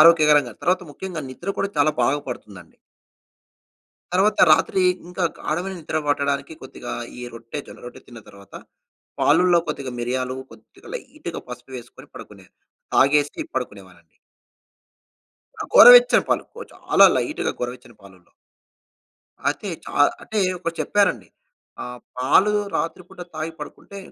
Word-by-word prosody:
ఆరోగ్యకరంగా. 150 -5 +6
తర్వాత 180 +1 +1
ముఖ్యంగా 180 -1 -6
నిద్ర 175 +9 -5
కూడా 195 - 0
చాలా 145 +1 +4
బాగా 145 +4 +1
పడుతుందండి. 100 -8 -10 1.4
తర్వాత 195 +4 +2
రాత్రి 190 +4 +3 0.3
ఇంకా 180 +1 -4 0.2
గాడమైన 175 +5 -3
నిద్ర 155 0 -3
పట్టడానికి 140 +1 -1
కొద్దిగా 130 -2 -8 0.3
ఈ - - -8
రొట్టె, 115 +5 -7
జొన్న - - -12
రొట్టె 120 - -11
తిన్న 120 -2 -12
తర్వాత 100 0 -17 0.7
పాలల్లో 180 -1 +4
కొద్దిగా 140 -3 -4
మిరియాలు, 130 +1 -2
కొద్దిగా - - -17
లైట్‌గా 270 - -8
పసుపు 125 +1 -10
వేసుకొని 120 -1 -13
పడుకునే - - -12 0.5
తాగేసి 145 - +3
పడుకునేవాళ్ళండి. - - -7 1.4
ఆ! - - -2
గోరవచ్చని - - +9
పాలు. - - +1 0.3
చాలా - - +4
లైట్‌గా 310 - -2
గొర్రవచ్చని 125 -1 -7
పాలల్లో. 95 -2 -18 1.2
అయితే - - -2 0.2
చా - - -9 0.3
అంటే 215 - -3 0.2
ఒకటి 165 -1 -4
చెప్పారండి. 185 - +1 0.6
ఆ! - - -6 0.3
పాలు 145 +11 +4 0.2
రాత్రిపూట 175 +2 -5
తాగి 155 +1 -4
పడుకుంటే 200 - -10
150 Hz, 120 wpm, -22 LUFS, 125-180 Hz, 1.4 s, గోరవచ్చని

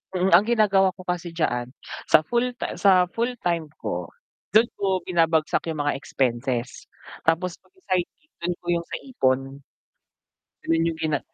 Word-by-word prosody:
Mm, 185 +1 +2
ang 175 +5 +7
ginagawa 195 -5 +3
ko 185 - -11
kasi 175 -2 -4
diyaan 125 -7 0 0.4
sa 155 - +6
full 240 +7 0
ta - - -5
sa 185 -2 +5
full-time 215 -9 -1
ko, - - -4 0.5
dun 220 - +8 0.2
ko 190 -3 0
binabagsak 165 -3 +1
'yung 155 -3 -2
mga 145 -1 0
expenses, 125 -2 -2 0.4
tapos 170 +2 +1
'pag - - -32
sa 375 - -26
side 180 -2 +2
gig 305 - -37
dun 175 +1 -1
ko - - -23
'yung 170 0 0
sa - - -5
ipon. 135 - -1 1.0
Ganun 165 0 +1
'yung 165 -1 -2
gina 155 -3 0
170 Hz, 165 wpm, -24 LUFS, 155-195 Hz, 1.0 s, dun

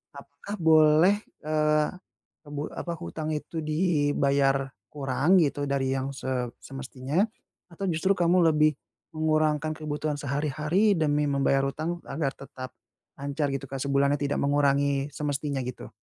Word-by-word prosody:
apakah 140 +9 -8
boleh, 160 +3 +6 0.3
eee, 150 0 +2 0.6
ebu 145 0 -4
apa, 170 - -4
hutang 155 -1 -5
itu 160 +2 -5
dibayar 145 -4 +1 0.2
kurang 145 +6 +2
gitu 145 -2 0
dari 135 -1 0
yang 135 +1 -2
se 130 -2 -3
semestinya, 135 +4 -2 0.5
atau 195 +4 -4
justru 170 +4 +2
kamu 175 +1 +4
lebih 150 -1 +3 0.4
mengurangkan 155 0 +1
kebutuhan 150 -1 -3
sehari-hari 150 +8 +1
demi 150 -1 +2
membayar 135 0 +2
hutang 160 +5 -3
agar 140 -1 -2
tetap 130 -1 -9 0.5
lancar 140 +1 -2
gitu 135 0 -3
kan 135 -1 -4
sebulannya 140 +1 +2
tidak 145 0 0
mengurangi 140 0 +2
semestinya 145 -1 -2
gitu? 125 0 -7
145 Hz, 125 wpm, -27 LUFS, 140-155 Hz, 0.6 s, boleh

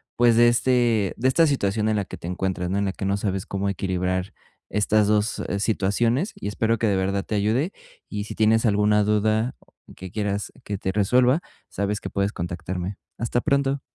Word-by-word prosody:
pues 120 -1 +4
de 120 0 +6
este 120 -4 +2
de 130 - +1
esta 160 +5 +4
situación 110 -7 0
en 110 -1 +1
la 100 - -1
que - - -9
te - - -11
encuentras, 90 0 -2
¿no?, 100 - 0
en 100 - 0
la 95 - -1
que 95 - -5
no 100 - +1
sabes 95 -2 -2
cómo 100 0 -2
equilibrar 95 0 -2 0.4
estas 105 0 +2
2 105 +2 +1 0.2
situaciones, 115 - +1
y - - -6
espero 110 +2 0
que 115 - +1
de 100 - +2
verdad 100 +1 0
te 110 - -3
ayude. 115 - +1 0.4
Y 105 -1 -3
si - - -8
tienes 110 +1 +3
alguna 105 0 +3
duda 110 +3 +1 0.4
que 95 0 -8
quieras 105 -1 -2
que 100 - -4
te 95 0 -3
resuelva, 125 - +3 0.3
sabes 100 +1 -2
que - - -6
puedes 100 +1 0
contactarme. 90 +2 -4 0.2
Hasta 120 +1 -1
pronto. 140 +1 +1
105 Hz, 195 wpm, -24 LUFS, 95-115 Hz, 0.4 s, de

